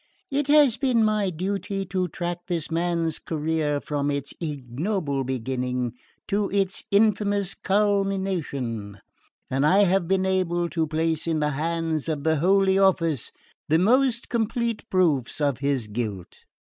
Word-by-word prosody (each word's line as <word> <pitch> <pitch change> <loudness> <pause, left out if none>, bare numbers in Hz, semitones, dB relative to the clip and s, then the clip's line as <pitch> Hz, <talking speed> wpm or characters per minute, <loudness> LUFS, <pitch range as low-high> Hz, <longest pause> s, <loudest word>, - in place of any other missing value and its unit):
"It 280 +1 0
has 290 -5 +5
been 255 -4 +2
my 210 -2 +1
duty 195 +3 -3
to 185 0 -1
track 175 +2 -5
this 170 -3 -2
man's 165 -1 0
career 155 -2 -1
from 145 -1 -2
its 140 -1 -2
ignoble 145 - -2
beginning 125 -1 -2 0.3
to 205 0 0
its 195 -1 0
infamous 205 -2 +2
culmination, 190 - -1 0.5
and 135 +2 0
I 190 +7 +5
have 190 -2 +2
been 190 +1 +1
able 175 -2 0
to 165 -2 -1
place 160 +1 -1
in 160 -1 +1
the 150 0 +1
hands 165 +1 -2
of 150 -3 -2
the 160 -1 +2
Holy 190 +4 +3
Office 165 - +2 0.4
the 160 - +5
most 240 +5 +2
complete 230 0 -2
proofs 155 -11 +1
of 140 -4 0
his 140 -4 0
guilt. 105 -4 -5
170 Hz, 140 wpm, -25 LUFS, 145-195 Hz, 0.5 s, has